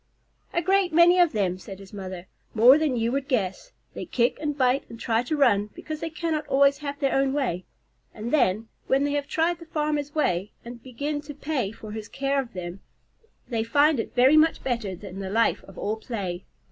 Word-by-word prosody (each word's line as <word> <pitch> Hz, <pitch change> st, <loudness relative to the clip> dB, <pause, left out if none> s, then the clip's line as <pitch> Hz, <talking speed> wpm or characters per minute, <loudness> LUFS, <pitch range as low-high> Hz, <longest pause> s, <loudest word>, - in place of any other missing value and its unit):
"A 345 Hz, -, 0 dB
great 380 Hz, 0 st, +2 dB
many 345 Hz, +3 st, +6 dB
of 350 Hz, -3 st, +5 dB
them," 185 Hz, -3 st, -1 dB
said 190 Hz, +1 st, -9 dB
his 195 Hz, 0 st, -14 dB
mother. 185 Hz, -3 st, -7 dB, 0.3 s
"More 250 Hz, +6 st, +7 dB
than 295 Hz, -5 st, 0 dB
you 230 Hz, +1 st, 0 dB
would 275 Hz, +1 st, -2 dB
guess. 235 Hz, -, -2 dB, 0.2 s
They -, -, -6 dB
kick 240 Hz, +2 st, +1 dB
and 295 Hz, -2 st, -2 dB
bite 255 Hz, 0 st, +2 dB
and 230 Hz, -, -10 dB
try 230 Hz, 0 st, +1 dB
to 300 Hz, +5 st, -2 dB
run 205 Hz, -7 st, +3 dB
because 310 Hz, -1 st, -6 dB
they 330 Hz, 0 st, -3 dB
cannot 315 Hz, -1 st, -2 dB
always 280 Hz, +1 st, +4 dB
have 285 Hz, -1 st, -5 dB
their 275 Hz, -2 st, +1 dB
own 270 Hz, 0 st, +2 dB
way; 240 Hz, -11 st, -1 dB, 0.5 s
and 225 Hz, +5 st, -6 dB
then, 225 Hz, -6 st, +2 dB, 0.2 s
when 270 Hz, +1 st, +3 dB
they 285 Hz, -, 0 dB
have 285 Hz, -1 st, -1 dB
tried 330 Hz, +1 st, 0 dB
the 335 Hz, -, -11 dB
farmer's 300 Hz, -1 st, -2 dB
way, 195 Hz, -, 0 dB
and 235 Hz, 0 st, -9 dB
begin 285 Hz, +4 st, -4 dB
to 290 Hz, 0 st, -9 dB
pay 275 Hz, -8 st, -2 dB
for 220 Hz, -1 st, -10 dB
his 215 Hz, -1 st, -6 dB
care 275 Hz, +3 st, 0 dB
of 240 Hz, -3 st, -11 dB
them, 180 Hz, 0 st, -6 dB, 0.7 s
they 230 Hz, -3 st, -1 dB
find 285 Hz, +4 st, +3 dB
it -, -, -4 dB
very 260 Hz, +5 st, +6 dB
much 320 Hz, +1 st, +3 dB
better 235 Hz, -7 st, -2 dB
than 195 Hz, 0 st, -9 dB
the 190 Hz, -1 st, -4 dB
life 225 Hz, +3 st, +1 dB
of 195 Hz, -, -15 dB
all 215 Hz, +2 st, -2 dB
play. 195 Hz, -6 st, -5 dB
260 Hz, 210 wpm, -25 LUFS, 210-300 Hz, 0.7 s, More